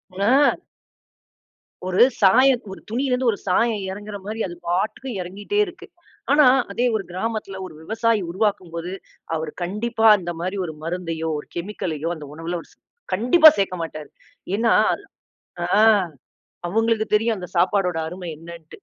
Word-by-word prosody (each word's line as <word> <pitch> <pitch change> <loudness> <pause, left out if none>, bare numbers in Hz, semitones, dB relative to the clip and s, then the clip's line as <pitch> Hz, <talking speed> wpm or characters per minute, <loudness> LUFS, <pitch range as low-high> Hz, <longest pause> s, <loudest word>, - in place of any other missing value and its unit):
ஆ. 250 +9 +4 1.3
ஒரு 185 +5 +4 0.2
சாயம் 250 +6 +5
ஒரு - - -11
துணியிலிருந்து 250 +1 +1
ஒரு 205 - -5
சாயம் 215 +2 +1
எறங்குற 205 +1 -7
மாரி 215 +2 -5
அது 175 - -8
பாட்டுக்கு 215 +9 -1
எறங்கிட்டே 205 - -3
இருக்கு. 370 +2 -11 0.4
ஆனா 295 0 +6 0.3
அதே 240 +5 0
ஒரு 210 - -1
கிராமத்துல 195 0 -4
ஒரு 180 - -10
விவசாயி 220 +3 0
உருவாக்கும்போது, 180 -3 -2 0.4
அவர் 160 -1 -3
கண்டிப்பா 225 +5 -1
அந்த 175 -2 -5
மாரி 185 +4 -3
ஒரு 160 - -6
மருந்தையோ, 165 -1 -3
ஒரு - - -11
கெமிக்கலயோ 170 -4 -3
அந்த 150 -2 -9
உணவுல 165 +2 -4 0.6
கண்டிப்பா 310 - +7
சேர்க்க 185 -3 -1
மாட்டாரு. 155 -2 -8 0.5
ஏன்னா 230 +1 +3 0.9
ஆ. - - 0 1.0
அவுங்களுக்கு 225 +3 +1
தெரியும் 225 +1 +2
அந்த 180 -1 -7
சாப்பாடோட 180 -1 +2
அருமை 180 +1 -7
என்னன்ட்டு. 165 -1 -12
195 Hz, 130 wpm, -22 LUFS, 175-225 Hz, 1.3 s, கண்டிப்பா